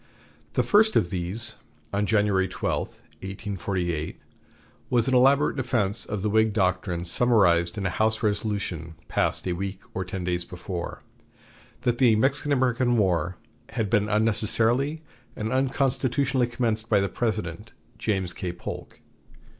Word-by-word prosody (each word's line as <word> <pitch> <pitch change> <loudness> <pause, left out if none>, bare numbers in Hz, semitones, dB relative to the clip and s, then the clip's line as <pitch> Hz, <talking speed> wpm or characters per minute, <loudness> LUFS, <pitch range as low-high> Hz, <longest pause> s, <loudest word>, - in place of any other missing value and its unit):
The - - +2
first 220 +1 +4
of 85 - +2
these, 100 +5 -3 0.4
on 100 +1 +1
January 100 -3 +2
12, 90 - -2 0.3
1848, 95 -4 -3 0.7
was 120 -1 +2
an 130 - +1
elaborate 135 +3 +4
defense 120 -6 0
of 105 -2 -4
the 105 - +1
Whig 110 0 +3
doctrine 90 -3 0
summarized 85 -4 +3
in 100 - -2
a 95 - +1
House 110 +5 +1
resolution 100 -6 -2
passed - - 0
a 90 - +1
week 95 +2 -4
or 95 - -2
ten 95 0 -5
days 90 0 -1
before, 90 0 -6 0.8
that 120 -1 +1
the 120 -4 +5
Mexican 130 -1 +2
War 90 -4 +1 0.3
"had 110 -4 -2
been 105 -2 +2
unnecessarily 115 +7 +1 0.3
and 110 +1 -3
unconstitutionally 130 -1 +1
commenced 115 -2 -1
by 105 - +4
the 100 - +1
President," 105 -2 -3 0.3
James 95 -5 -1
K. 90 0 -4
Polk. 90 - -8
105 Hz, 135 wpm, -26 LUFS, 95-120 Hz, 0.8 s, the